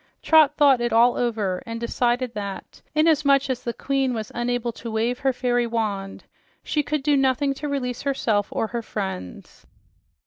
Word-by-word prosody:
Trot 310 -2 +5
thought 275 -4 +5
it 240 0 0
all 235 +2 +5
over, 215 -6 -1
and 230 0 -4
she 235 - -3
decided 245 +1 0
that 200 -2 -7
inasmuch 290 -3 +3
as 250 - -3
the 235 - -2
queen 270 0 -1
was 220 -1 -5
unable 240 0 -1
to 230 +1 -8
wave 230 +3 -1
her 270 - +2
fairy 245 -1 0
wand, 205 -4 -3 0.4
she 300 - 0
could 295 -1 -2
do 295 0 +3
nothing 270 +1 +2
to 295 +2 -6
release 250 -3 -3
herself 225 -7 0
or - - -1
her 235 +2 -4
friends. 190 - -7
245 Hz, 175 wpm, -23 LUFS, 225-275 Hz, 0.4 s, Trot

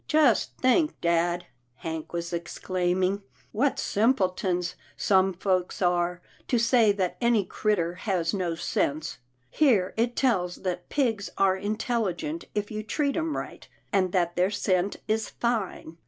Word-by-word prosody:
" - - -43
Just 305 -7 +3
think, 300 +5 +2
dad," 170 +1 +1 0.3
Hank 160 +3 -5
was 170 0 -4
exclaiming, 185 +2 -1 0.2
" - - -32
what 285 -1 +3
simpletons 185 -5 +1 0.2
some 190 -1 +3
folks 185 0 -1
are, 175 -1 +1 0.2
to 245 - +2
say 230 -2 +4
that 185 -3 -1
any 235 -4 +3
critter 180 -6 0
has 185 -2 -1
no 180 -4 -1
sense. 155 -3 -1 0.3
Here 225 -12 +3
it 235 +1 +1
tells 185 -9 +1
that 180 -1 -3
pigs 225 -8 0
are 195 -1 +4
intelligent 220 - -2
if 210 0 -2
you 215 0 -3
treat 280 +6 -1
'em 325 -2 -1
right, - - -7 0.3
and 185 -2 +2
that 175 -2 +1
their 180 +2 +3
scent 195 -1 0
is 220 0 0
fine. 205 -8 -2
190 Hz, 145 wpm, -27 LUFS, 175-230 Hz, 0.3 s, say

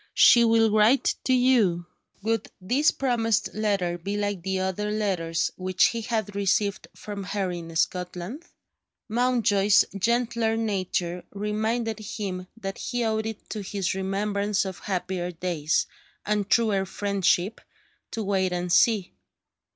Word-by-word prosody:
She 235 - +7
will 225 -1 +4
write 215 +5 +4
to 260 - +3
you." 235 -9 +3 0.4
Would 225 -1 0
this 255 +11 +2
promised 230 -5 0
letter 195 -5 0
be 200 +4 -3
like 205 -3 -2
the 190 +2 -2
other 190 +2 -2
letters 185 -6 -1
which 185 0 +3
he 230 - -4
had 220 -3 -2
received 200 +1 0
from 205 -2 -7
her 190 -1 -2
in 165 -2 -7
Scotland? 180 - -2 0.6
Mountjoy's 220 -4 +3
gentler 230 +1 +1
nature 185 -5 -2
reminded 220 +2 -2
him 195 -4 -5
that 195 -3 -6
he 245 -1 -2
owed 220 0 0
it 220 -1 -7
to 215 - -3
his 195 -2 -2
remembrance 200 +1 -1
of 190 -1 -6
happier 185 -2 -3
days, 165 -3 -1 0.4
and 210 -1 0
truer 205 -5 +2
friendship, 200 0 0 0.5
to 225 - -4
wait 190 -2 +1
and 175 0 -1
see. 210 -2 +3
205 Hz, 135 wpm, -26 LUFS, 185-225 Hz, 0.6 s, She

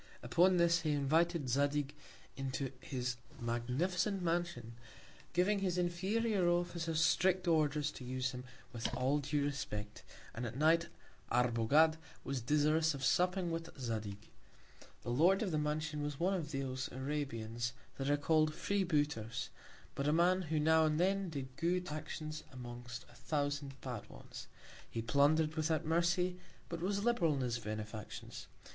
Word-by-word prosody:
Upon 180 +1 +4
this, 170 0 +4
he 155 -2 0
invited 155 +2 +2
Zadig 145 +2 +1 0.4
into 135 -1 -3
his 125 -2 -3 0.2
magnificent 165 - 0
Mansion, 170 -9 -1 0.6
giving 195 +4 +2
his 185 -2 0
inferior 190 +3 +1
Officers 170 -2 0
strict 185 +2 +3
Orders 150 -2 +2
to 130 - -9
use 130 +1 -2
him 125 -1 -7 0.3
with 115 -1 -2
all 135 +3 +2
due 145 0 0
Respect; 105 -7 -4 0.3
and 120 - -5
at 115 +2 -6
Night 165 +3 +4 0.4
Arbogad 125 +7 +4 0.3
was 135 -2 -2
desirous 150 +4 +3
of 135 -1 -3
supping 180 +6 +2
with 165 0 -3
Zadig. 110 -4 -4 0.7
The 120 - -3
Lord 175 - +4
of 195 - -1
the 155 - +1
Mansion 150 0 -1
was 145 -1 -3
one 185 +3 +2
of 165 -6 -2
those 130 -2 -3
Arabians, 120 -4 -3 0.2
that 135 +1 -1
are 145 - +4
call'd 155 +1 +2
Free 200 -1 0
booters; 145 - -1 0.4
but 140 - -2
a - - +4
Man 175 +3 +4
who 160 -1 +1
now 160 +1 +5
and 155 0 +2
then 195 +1 +2
did 135 -4 -6
good 180 +3 0
Actions 155 0 -5
amongst 120 -1 -7
a - - -20
Thousand 145 +1 -2
bad 125 -5 -6
ones. - - -10 0.4
He 115 - -3
plunder'd 150 +6 +3
without 160 0 0
Mercy; 175 +2 +1 0.3
but 170 -1 -4
was 200 +2 0
liberal 205 -10 +3
in 135 - -2
his 120 -2 -1
Benefactions. 110 -1 -6
150 Hz, 150 wpm, -35 LUFS, 130-170 Hz, 0.7 s, now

